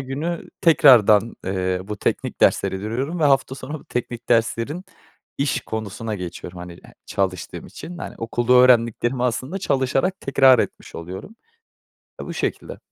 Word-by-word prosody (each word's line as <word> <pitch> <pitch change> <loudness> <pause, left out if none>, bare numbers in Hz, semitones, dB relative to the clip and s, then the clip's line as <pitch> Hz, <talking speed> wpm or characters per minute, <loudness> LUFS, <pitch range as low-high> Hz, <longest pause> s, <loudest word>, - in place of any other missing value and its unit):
günü 150 +6 -4
tekrardan, 115 - +5
eee, 95 -1 -1
bu 105 +1 -5
teknik - - -2
dersleri 95 - +3
görüyorum 130 - -3
ve - - +3
hafta 135 -2 +2
sonu 145 +3 -8
teknik 120 -1 -5
derslerin 120 +8 0 0.5
iş 140 -1 0
konusuna 110 0 -5
geçiyorum. 90 -1 -7
Hani, 90 -1 -9 0.3
çalıştığım 95 -3 -3
için, 175 0 -9
hani, - - -7
okulda 120 +2 0
öğrendiklerimi 120 0 +4
aslında 130 +9 -2
çalışarak 140 +3 0
tekrar 135 -2 +5
etmiş - - -5
oluyorum. 95 - -8 0.8
Ya, - - -6
bu - - -6
şekilde. - - -3
120 Hz, 135 wpm, -22 LUFS, 105-135 Hz, 0.8 s, tekrardan